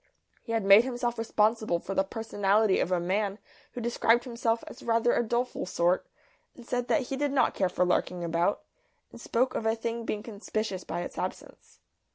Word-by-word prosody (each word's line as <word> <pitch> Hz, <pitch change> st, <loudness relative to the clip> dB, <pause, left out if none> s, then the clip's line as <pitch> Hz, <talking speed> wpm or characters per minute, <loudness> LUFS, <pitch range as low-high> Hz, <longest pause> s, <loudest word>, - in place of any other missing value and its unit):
He 230 Hz, -, -5 dB
had 225 Hz, -3 st, 0 dB
made 200 Hz, +3 st, +8 dB
himself 240 Hz, -2 st, -2 dB
responsible 220 Hz, -3 st, +1 dB
for 190 Hz, +3 st, -6 dB
the 190 Hz, -, +2 dB
personality 205 Hz, -1 st, +1 dB
of -, -, 0 dB
a 180 Hz, -, +2 dB
man 195 Hz, +3 st, -1 dB, 0.4 s
who 245 Hz, -, -5 dB
described 235 Hz, 0 st, +2 dB
himself 235 Hz, -2 st, -1 dB
as 260 Hz, -, -11 dB
rather 230 Hz, +1 st, +2 dB
a -, -, +2 dB
doleful 240 Hz, -3 st, -2 dB
sort, 175 Hz, 0 st, +1 dB, 0.5 s
said 245 Hz, 0 st, -3 dB
that 310 Hz, -, +2 dB
he 270 Hz, -, -1 dB
did 285 Hz, +1 st, -1 dB
not 260 Hz, -4 st, +2 dB
care 190 Hz, -2 st, +1 dB
for 180 Hz, 0 st, +1 dB
larking 180 Hz, 0 st, 0 dB
about, 170 Hz, +3 st, 0 dB, 0.5 s
and -, -, -12 dB
spoke 255 Hz, +2 st, 0 dB
of 225 Hz, -, -2 dB
a 220 Hz, -, +2 dB
thing 230 Hz, +1 st, -4 dB
being 210 Hz, -2 st, -3 dB
conspicuous 215 Hz, -3 st, -4 dB
by -, -, -4 dB
its -, -, -6 dB
absence. -, -, -7 dB
225 Hz, 190 wpm, -28 LUFS, 195-240 Hz, 0.5 s, made